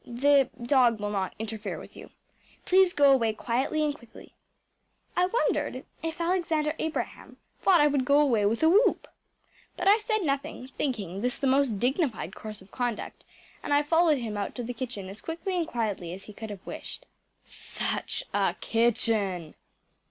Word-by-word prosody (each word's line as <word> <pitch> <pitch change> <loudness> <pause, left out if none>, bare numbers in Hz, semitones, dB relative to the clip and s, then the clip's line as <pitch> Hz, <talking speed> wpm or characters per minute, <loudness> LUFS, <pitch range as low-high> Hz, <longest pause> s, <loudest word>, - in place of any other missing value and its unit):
the 270 +2 +3
dog 240 -2 +3
will 205 0 -2
not 195 -2 -2
interfere 220 0 -4
with - - -12
you. - - -11 0.6
Please 375 0 +5
go 285 -4 +5
away 230 -4 +2
quietly 260 +8 -1
and 295 -1 +1
quickly.‚ÄĚ 235 -6 -15 0.8
I 360 - +4
wondered 340 - -1 0.2
if 325 +1 -4
Alexander 335 -3 0
Abraham 320 0 -4 0.2
thought 370 -3 +5
I - - +6
would 285 -3 +2
go 280 +3 +4
away 245 -8 +3
with 230 +7 0
a - - +6
whoop. 415 +8 +3 0.7
But 360 - -1
I 415 +3 +7
said 435 -1 -1
nothing, 275 -3 -2
thinking 205 - -3
this 250 +1 0
the 275 - -2
most 265 -5 +2
dignified 265 - 0
course 215 -2 -8
of 190 - -22
conduct, 245 -3 -4 0.4
and - - -5
I 290 - +4
followed 325 0 +3
him 225 -4 -4
out 200 - -3
to 245 - -4
the 245 +2 -4
kitchen 235 -6 -5
as 195 +3 -9
quickly 335 +3 -4
and 340 -2 0
quietly 210 - -2
as 190 +2 -9
he 210 - -11
could 220 +1 -8
have 200 -3 -9
wished. - - -7 0.4
Such - - -3
a - - +1
kitchen! 210 -7 0
260 Hz, 175 wpm, -28 LUFS, 220-315 Hz, 0.8 s, I